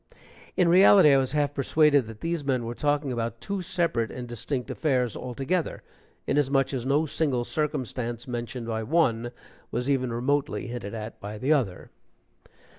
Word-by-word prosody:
In 180 Hz, -, +4 dB
reality, 180 Hz, -3 st, +7 dB
I -, -, +6 dB
was 130 Hz, 0 st, 0 dB
half 145 Hz, -1 st, +1 dB
persuaded 145 Hz, -2 st, +3 dB
that 110 Hz, -1 st, -10 dB
these 165 Hz, -2 st, -2 dB
men 130 Hz, -4 st, 0 dB
were 115 Hz, -, -4 dB
talking 145 Hz, +1 st, 0 dB
about 115 Hz, -1 st, -3 dB
two 200 Hz, +6 st, -3 dB
separate 170 Hz, -10 st, 0 dB
and 125 Hz, -1 st, -7 dB
distinct 120 Hz, +1 st, -4 dB
affairs 125 Hz, -7 st, 0 dB
altogether, 135 Hz, +7 st, -2 dB, 0.4 s
inasmuch 135 Hz, -1 st, +1 dB
as 130 Hz, -1 st, -3 dB
no 145 Hz, +3 st, +2 dB
single 140 Hz, -5 st, 0 dB
circumstance 125 Hz, -5 st, -3 dB
mentioned 120 Hz, 0 st, -4 dB
by 110 Hz, -1 st, -2 dB
one 120 Hz, -3 st, +1 dB, 0.4 s
was 125 Hz, +4 st, -1 dB
even 130 Hz, -3 st, 0 dB
remotely 140 Hz, +5 st, -1 dB
hinted 115 Hz, -4 st, -6 dB
at 110 Hz, 0 st, -7 dB
by 105 Hz, +1 st, -7 dB
the 135 Hz, +8 st, +2 dB
other. 115 Hz, -12 st, -2 dB
130 Hz, 160 wpm, -26 LUFS, 120-150 Hz, 0.4 s, reality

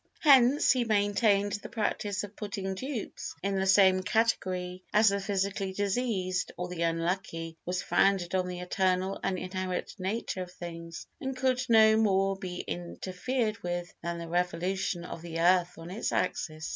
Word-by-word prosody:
Hence, 270 Hz, -2 st, +6 dB
he 250 Hz, -1 st, +2 dB
maintained, 205 Hz, -1 st, +2 dB
the -, -, -8 dB
practice 205 Hz, -2 st, -2 dB
of 205 Hz, 0 st, -8 dB
putting 200 Hz, -2 st, -4 dB
dupes 255 Hz, +3 st, -5 dB
in 195 Hz, 0 st, 0 dB
the 190 Hz, -, 0 dB
same 190 Hz, -1 st, +6 dB
category 185 Hz, -4 st, 0 dB
as 215 Hz, 0 st, +5 dB
the 200 Hz, 0 st, 0 dB
physically 195 Hz, -1 st, -1 dB
diseased 195 Hz, -3 st, -1 dB
or 180 Hz, 0 st, -4 dB
the 180 Hz, -2 st, -5 dB
unlucky 165 Hz, 0 st, -1 dB
was 180 Hz, +1 st, -1 dB
founded 190 Hz, -3 st, +2 dB
on 185 Hz, -1 st, +1 dB
the 180 Hz, 0 st, -5 dB
eternal 185 Hz, +1 st, 0 dB
and 185 Hz, -, 0 dB
inherent 185 Hz, 0 st, -3 dB
nature 190 Hz, 0 st, -2 dB
of 180 Hz, -1 st, -6 dB
things, 170 Hz, -2 st, -8 dB
and 265 Hz, -4 st, -4 dB
could 255 Hz, -1 st, +1 dB
no 220 Hz, -1 st, +7 dB
more 195 Hz, -3 st, +2 dB
be 185 Hz, -2 st, -5 dB
interfered 185 Hz, -, -3 dB
with 175 Hz, 0 st, -4 dB
than 170 Hz, 0 st, -3 dB
the 170 Hz, 0 st, -6 dB
revolution 175 Hz, +1 st, -1 dB
of 165 Hz, -, -7 dB
the 165 Hz, -1 st, -5 dB
earth 180 Hz, +1 st, +3 dB
on 165 Hz, +2 st, -9 dB
its 210 Hz, -, -2 dB
axis. 155 Hz, -3 st, -2 dB
190 Hz, 160 wpm, -29 LUFS, 180-205 Hz, -, no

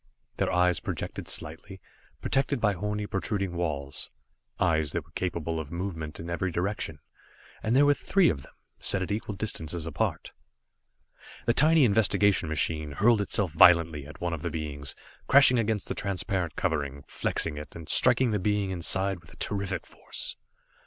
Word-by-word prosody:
Their -, -, 0 dB
eyes 90 Hz, 0 st, +3 dB
projected -, -, -5 dB
slightly, 90 Hz, +5 st, -5 dB, 0.4 s
protected 135 Hz, 0 st, +1 dB
by 105 Hz, -3 st, +2 dB
horny 105 Hz, +2 st, -3 dB
protruding 100 Hz, -2 st, -2 dB
walls 75 Hz, -5 st, -3 dB, 0.5 s
eyes 80 Hz, -3 st, +2 dB
that -, -, -2 dB
were -, -, -24 dB
capable 85 Hz, -3 st, -2 dB
of 75 Hz, -2 st, -7 dB
movement 85 Hz, -4 st, -5 dB
in 85 Hz, -, -6 dB
every 85 Hz, +2 st, -2 dB
direction 90 Hz, -3 st, -2 dB, 0.6 s
and 110 Hz, +3 st, 0 dB
there 140 Hz, +2 st, +6 dB
were 145 Hz, -, +6 dB
three 190 Hz, +5 st, +2 dB
of 70 Hz, -, 0 dB
them, -, -, -15 dB, 0.3 s
set 95 Hz, -, +1 dB
at 95 Hz, -, -5 dB
equal 105 Hz, 0 st, -3 dB
distances 85 Hz, -6 st, -3 dB
apart. 80 Hz, -3 st, -2 dB, 1.1 s
The 120 Hz, -, +3 dB
tiny 155 Hz, +3 st, +6 dB
investigation 100 Hz, -4 st, +3 dB
machine 75 Hz, -1 st, -1 dB
hurled 110 Hz, +6 st, +4 dB
itself 100 Hz, -3 st, +1 dB
violently 80 Hz, -3 st, +5 dB
at 75 Hz, -, -12 dB
one 85 Hz, -1 st, -2 dB
of 80 Hz, -, -4 dB
the 85 Hz, -, -2 dB
beings, 75 Hz, -3 st, -3 dB, 0.3 s
crashing 130 Hz, -2 st, +6 dB
against 110 Hz, -2 st, -1 dB
the -, -, -2 dB
transparent 95 Hz, -5 st, -2 dB
covering, 70 Hz, -6 st, -2 dB
flexing 75 Hz, -2 st, -2 dB
it, 75 Hz, -, -10 dB
and 80 Hz, -2 st, -9 dB
striking 130 Hz, -3 st, +4 dB
the 105 Hz, -, 0 dB
being 100 Hz, 0 st, 0 dB
inside 95 Hz, +2 st, 0 dB
with 80 Hz, -2 st, -17 dB
terrific 100 Hz, -3 st, -2 dB
force. -, -, -4 dB
90 Hz, 160 wpm, -28 LUFS, 80-105 Hz, 1.1 s, there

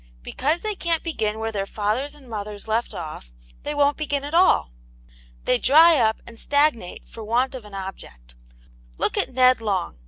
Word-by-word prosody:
Because 300 Hz, -, -1 dB
they 430 Hz, -1 st, -2 dB
can't 335 Hz, -4 st, -1 dB
begin 220 Hz, -10 st, -2 dB
where 225 Hz, 0 st, -3 dB
their 195 Hz, -2 st, -3 dB
fathers 220 Hz, +9 st, -2 dB
and 280 Hz, -3 st, -16 dB
mothers 210 Hz, -2 st, -6 dB
left 225 Hz, +2 st, -1 dB
off, 155 Hz, -, -8 dB, 0.3 s
they 295 Hz, -, -4 dB
won't 290 Hz, 0 st, +2 dB
begin 285 Hz, -2 st, -2 dB
at 290 Hz, +2 st, -6 dB
all. 345 Hz, -, +4 dB, 0.7 s
They 250 Hz, -, +2 dB
dry 320 Hz, +5 st, +6 dB
up 220 Hz, -2 st, +1 dB
and 230 Hz, -1 st, -13 dB
stagnate 285 Hz, -10 st, 0 dB
for 225 Hz, -, -10 dB
want 245 Hz, +5 st, 0 dB
of 250 Hz, -4 st, -8 dB
an 205 Hz, -1 st, -11 dB
object. 65 Hz, -, -9 dB, 0.6 s
Look -, -, 0 dB
at -, -, 0 dB
Ned 255 Hz, -1 st, +4 dB
Long. 190 Hz, -, -2 dB
235 Hz, 180 wpm, -23 LUFS, 210-290 Hz, 0.7 s, dry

